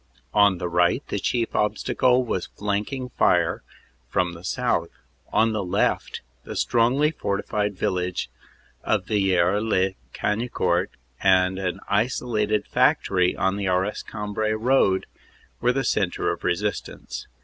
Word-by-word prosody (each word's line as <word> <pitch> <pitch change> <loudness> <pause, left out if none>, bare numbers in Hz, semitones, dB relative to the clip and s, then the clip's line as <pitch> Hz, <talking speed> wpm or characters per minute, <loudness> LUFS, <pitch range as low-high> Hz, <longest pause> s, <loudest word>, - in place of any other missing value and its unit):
On 100 -3 +5
the 90 - -3
right 85 0 +2
the - - -1
chief 120 -2 -1
obstacle 125 +4 +2
was 95 -6 -2
the - - -35
flanking 105 +6 -2
fire - - +2 0.5
from 90 0 0
the 85 +1 -11
south; - - 0 0.4
on 115 0 +3
the 105 -2 -1
left 90 - 0 0.2
the - - -7
strongly 130 +6 +2
fortified 105 - -2
village 90 0 -1 0.6
of - - 0
Villers 95 -1 +2
lez 95 -4 +1 0.2
Cagnicourt 110 +4 0 0.3
and 95 -1 +3
an 95 0 -3
isolated 110 -1 0
factory 90 -1 +2
on 95 +1 0
the 100 -1 -2
Arras 95 +3 0
Cambrai 110 0 -3
road 110 -4 +2 0.5
were 120 - +3
the 135 +1 -1
centre 95 -7 0
of - - -6
resistance. 90 -9 -3
105 Hz, 130 wpm, -24 LUFS, 95-110 Hz, 0.6 s, On